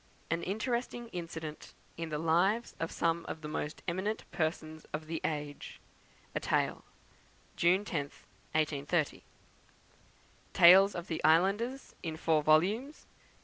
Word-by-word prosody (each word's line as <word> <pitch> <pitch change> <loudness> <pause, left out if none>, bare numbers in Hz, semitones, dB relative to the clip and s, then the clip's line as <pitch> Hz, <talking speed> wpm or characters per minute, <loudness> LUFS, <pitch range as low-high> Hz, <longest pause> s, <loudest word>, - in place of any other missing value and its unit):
An 165 +1 +1
interesting 235 +4 -2
Incident 165 -4 -7 0.2
in 165 -1 -5
the 150 - -2
Lives 175 +9 +2
of 165 - -2
some 165 0 0
of 160 - -6
the 150 - -6
most 150 0 -4
eminent 190 +5 -2
Persons 160 -2 -2
of 155 +1 -3
the 160 0 -4
Age, 150 -2 -4 0.5
a - - -1
Tale, - - 0 0.7
June 185 +4 +3
10th, 145 -7 -4 0.3
1830. 155 0 0 1.3
Tales 190 +4 +8
of 175 -1 -4
the 160 - -4
Islanders, 200 - +2
in 160 -2 -4
four 160 -1 +2
volumes. 195 - +2
165 Hz, 125 wpm, -32 LUFS, 155-195 Hz, 1.3 s, Tales